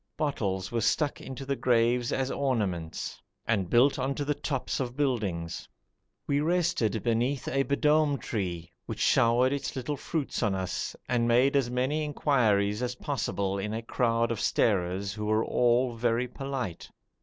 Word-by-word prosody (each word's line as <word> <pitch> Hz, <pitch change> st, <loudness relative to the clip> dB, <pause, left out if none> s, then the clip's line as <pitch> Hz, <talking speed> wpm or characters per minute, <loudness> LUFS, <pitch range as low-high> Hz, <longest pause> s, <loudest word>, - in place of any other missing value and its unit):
Bottles 95 Hz, -11 st, -1 dB
were 115 Hz, -1 st, 0 dB
stuck 145 Hz, +6 st, +1 dB
into 135 Hz, +1 st, -7 dB
the 140 Hz, 0 st, -1 dB
graves 120 Hz, -1 st, +2 dB
as 135 Hz, 0 st, -1 dB
ornaments, 100 Hz, -, -2 dB, 0.2 s
and 100 Hz, -6 st, 0 dB
built 130 Hz, +6 st, +4 dB
on 135 Hz, +2 st, -1 dB
to 145 Hz, -, -2 dB
the 150 Hz, -, +1 dB
tops 140 Hz, -2 st, -3 dB
of 125 Hz, -1 st, -3 dB
buildings. 95 Hz, -, -2 dB, 0.6 s
We 140 Hz, 0 st, +1 dB
rested 155 Hz, -, +1 dB
beneath 120 Hz, +3 st, 0 dB
a 135 Hz, -, +1 dB
b'dom 150 Hz, +1 st, +2 dB
tree, 85 Hz, -8 st, -4 dB, 0.2 s
which -, -, -5 dB
showered 120 Hz, +3 st, +4 dB
its 140 Hz, -, -3 dB
little 135 Hz, +3 st, -3 dB
fruits 155 Hz, 0 st, -3 dB
on 105 Hz, -5 st, +1 dB
us, 95 Hz, -1 st, -3 dB
and 120 Hz, -1 st, +1 dB
made 125 Hz, +4 st, +4 dB
as 135 Hz, -4 st, +2 dB
many 130 Hz, +5 st, 0 dB
inquiries 110 Hz, -8 st, +1 dB
as 125 Hz, 0 st, -2 dB
possible 100 Hz, -8 st, -2 dB
in 105 Hz, +2 st, -3 dB
a 115 Hz, -, -4 dB
crowd 115 Hz, 0 st, +1 dB
of 115 Hz, -, -2 dB
starers 100 Hz, -1 st, +1 dB
who 105 Hz, +1 st, -5 dB
were 110 Hz, +1 st, +2 dB
all 120 Hz, +1 st, +2 dB
very 120 Hz, +1 st, 0 dB
polite. 125 Hz, -9 st, -5 dB
120 Hz, 160 wpm, -28 LUFS, 105-135 Hz, 0.6 s, built